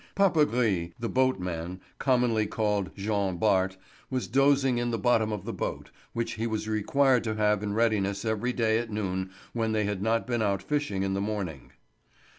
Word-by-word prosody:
Papagris, 125 - +2
the 115 -1 -3
boatman, 90 -9 -1 0.2
commonly 120 -5 +2
called 105 -3 0
Jean 100 -2 -1
Bart, 95 -1 +2 0.3
was 130 -2 -1
dozing 135 -1 +3
in 120 0 0
the 115 - -1
bottom 115 -3 +2
of 105 -4 -4
the - - -4
boat, - - -4 0.2
which 115 0 -2
he 115 +1 -2
was 110 -1 -3
required 125 +4 +2
to 110 -2 -2
have 105 -1 +2
in 105 -1 -2
readiness 105 -3 +1
every 110 +3 0
day 115 -2 +2
at 120 -1 -4
noon 95 -3 -2 0.2
when 115 -2 0
they 110 -1 +1
had 100 -2 -2
not 115 +2 +1
been 120 -2 -1
out 100 -3 0
fishing 145 -8 -1
in 95 0 -1
the 100 - -1
morning. 100 - -4
110 Hz, 180 wpm, -28 LUFS, 100-120 Hz, 0.3 s, dozing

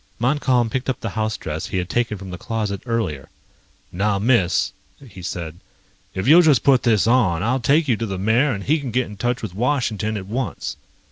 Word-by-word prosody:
Montcalm 125 -2 +1
picked 130 +2 -2
up 130 - -1
the 115 - -4
house 110 -1 -2
dress 80 0 -5
he 95 - -3
had 90 -1 -1
taken 120 0 -1
from 95 -1 -9
the 90 - -7
closet 105 -4 -3
earlier. 105 - -2 0.6
"Now, 100 +3 0
Miss," 105 -4 +2 0.4
he 95 -4 -12
said, 85 -2 -5 0.6
"if 95 +4 -2
you'll 165 +5 +8
just 150 -7 +4
put 135 -3 +5
this 110 -5 +3
on, 110 -8 +2
I'll 125 +4 +1
take 145 +6 +2
you 120 - +3
to 115 - -3
the 95 -2 -4
mayor 115 +9 +2
and 100 -4 -4
he 155 +7 +2
can 140 -3 -5
get 125 +2 0
in 105 - -10
touch 120 +4 -2
with 105 - -5
Washington 110 -2 -1
at 95 - -6
once." 115 0 -4
110 Hz, 210 wpm, -21 LUFS, 95-125 Hz, 0.6 s, you'll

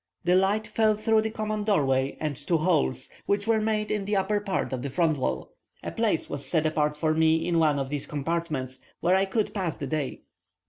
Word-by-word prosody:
The 175 - +3
light 200 +3 +2
fell 215 -1 +2
through 220 +1 +2
the 220 - -1
common 215 -1 -3
door 200 -9 +2
way 135 +1 0
and 155 -2 -2
two 150 +6 0
holes, 155 - +1 0.2
which 200 0 +1
were 225 -1 +2
made 215 -1 0
in 205 -2 -1
the 205 +1 0
upper 200 +2 +1
part 200 -8 -2
of 130 - -2
the 140 - -3
front 155 0 +1
wall. 65 - -2 0.3
A - - -4
place - - 0
was - - -4
set 160 - +1
apart 150 -1 +1
for 155 0 +1
me 160 +1 +3
in 170 -1 +2
one 155 -3 +3
of 135 0 -3
these 145 -1 -1
compartments, 145 -4 -3 0.2
where 180 - +2
I 190 +1 +3
could 210 +2 -1
pass 185 -6 -2
the 140 - -4
day. 145 -1 -3
170 Hz, 225 wpm, -27 LUFS, 150-205 Hz, 0.3 s, The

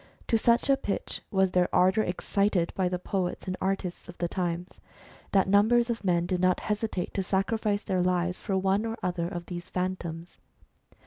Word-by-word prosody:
To 225 - +4
such 235 +3 +3
a 275 -1 +4
pitch 200 - -3
was 190 -2 +2
their 180 -1 +2
ardour 190 +4 +4
excited 185 -1 0
by 185 -2 +1
the 180 - -1
poets 180 0 -3
and 185 -1 -2
artists 190 -2 -2
of 175 - -10
the 175 - -1
times, 175 0 -3 0.5
that 195 -2 +3
numbers 230 +5 +4
of 230 - -4
men 175 -2 +2
did 180 0 -1
not 185 -1 +3
hesitate 210 -3 -2
to 195 - 0
sacrifice 205 +2 0
their 185 -3 0
lives 180 0 0
to 195 -3 +1
one 195 +2 +2
or 225 0 -4
other 175 -2 -1
of 175 -1 -5
these 175 -1 -7
Phantoms. 175 -2 -4
185 Hz, 185 wpm, -28 LUFS, 180-205 Hz, 0.5 s, To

